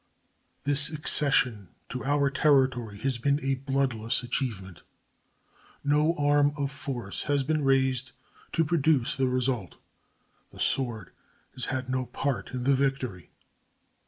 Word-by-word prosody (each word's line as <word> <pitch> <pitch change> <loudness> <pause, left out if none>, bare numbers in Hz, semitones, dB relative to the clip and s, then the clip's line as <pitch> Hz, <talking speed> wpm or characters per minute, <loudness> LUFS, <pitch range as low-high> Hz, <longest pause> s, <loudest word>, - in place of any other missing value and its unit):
This 145 +1 +4
accession 135 - +1 0.2
to 125 - -5
our 140 0 +2
territory 130 -7 +2
has 130 -3 -1
been 140 +3 +1
a 135 0 +1 0.2
bloodless 125 -5 0
achievement. 105 -8 -3 1.0
No 150 +3 +2
arm 145 -1 +3
of 140 -1 -2
force 120 -7 -4
has 145 -2 +1
been 155 +2 0
raised 130 -1 +1 0.4
to 165 - +2
produce 150 -6 +2
the 135 -1 +1
result. 125 -6 -1 0.7
The - - -15
sword 120 -5 -1 0.4
has 125 - -3
had 130 -1 -3
no 130 -1 -2
part 140 -2 -2
in 125 -1 -4
the 140 +2 +3
victory. 135 - -1
135 Hz, 130 wpm, -27 LUFS, 125-145 Hz, 1.0 s, This